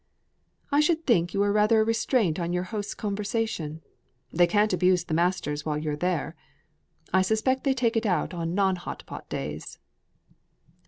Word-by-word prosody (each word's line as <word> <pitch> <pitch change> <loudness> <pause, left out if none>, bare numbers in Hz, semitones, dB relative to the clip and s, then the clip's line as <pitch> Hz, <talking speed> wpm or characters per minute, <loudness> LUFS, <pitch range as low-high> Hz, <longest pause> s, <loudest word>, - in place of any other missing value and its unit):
"I 285 - +4
should 325 +1 +2
think 175 - +3
you 200 - +2
were 205 0 +2
rather 215 +2 +4
a - - +5
restraint 225 - +1
on 170 0 -2
your 180 0 0
hosts' 205 -2 -3
conversation. 205 -6 -3 0.5
They 175 +1 +4
can't 210 +3 +2
abuse 180 -1 +3
the 160 - -5
masters 165 -3 0
while 150 -2 -1
you're 150 -1 -2
there. 175 0 -2 0.8
I 190 - +5
expect 220 +8 +1
they 270 -1 +2
take 235 -2 +1
it 225 0 +1
out 185 -1 0
on 170 0 -3
non 190 -2 +2
hot 175 - -7
pot - - -9
days." 75 +1 -5
190 Hz, 170 wpm, -26 LUFS, 170-220 Hz, 0.8 s, a